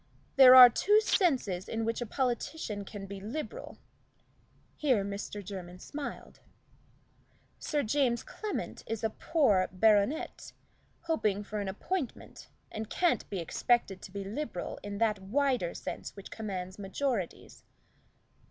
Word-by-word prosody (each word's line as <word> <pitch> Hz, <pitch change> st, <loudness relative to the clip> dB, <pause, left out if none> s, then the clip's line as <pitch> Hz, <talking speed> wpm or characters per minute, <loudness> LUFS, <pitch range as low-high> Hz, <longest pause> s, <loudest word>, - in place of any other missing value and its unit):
There 260 Hz, -1 st, +10 dB
are 255 Hz, -1 st, +13 dB
two 415 Hz, -, +3 dB
senses 260 Hz, -, +1 dB
in 225 Hz, 0 st, -2 dB
which 230 Hz, +1 st, -2 dB
a 240 Hz, -, -3 dB
politician 240 Hz, -4 st, -2 dB
can 200 Hz, 0 st, -8 dB
be 195 Hz, 0 st, -7 dB
liberal" 265 Hz, +10 st, -6 dB, 1.0 s
here 255 Hz, -10 st, +1 dB
Mr. 200 Hz, 0 st, -6 dB
Jermyn 180 Hz, -2 st, -7 dB
smiled 290 Hz, +8 st, -7 dB, 1.2 s
"Sir 295 Hz, -2 st, -1 dB
James 240 Hz, 0 st, +1 dB
Clement 425 Hz, -1 st, -5 dB
is 225 Hz, -1 st, -4 dB
a 220 Hz, -, +1 dB
poor 220 Hz, -, +2 dB
baronet, 210 Hz, -, +1 dB, 0.5 s
hoping 215 Hz, -12 st, 0 dB
for 210 Hz, +1 st, -5 dB
an 200 Hz, -, -3 dB
appointment, 265 Hz, -, -5 dB, 0.2 s
and 220 Hz, 0 st, -5 dB
can't 350 Hz, -2 st, +1 dB
be 200 Hz, -, -3 dB
expected 195 Hz, +3 st, 0 dB
to -, -, -10 dB
be 200 Hz, +1 st, -5 dB
liberal 210 Hz, -1 st, -5 dB
in 205 Hz, 0 st, -6 dB
that 215 Hz, -2 st, +1 dB
wider 240 Hz, -2 st, 0 dB
sense -, -, -6 dB
which 200 Hz, -, -10 dB
commands 190 Hz, -3 st, -5 dB
majorities." 205 Hz, 0 st, -3 dB
220 Hz, 130 wpm, -30 LUFS, 200-270 Hz, 1.2 s, are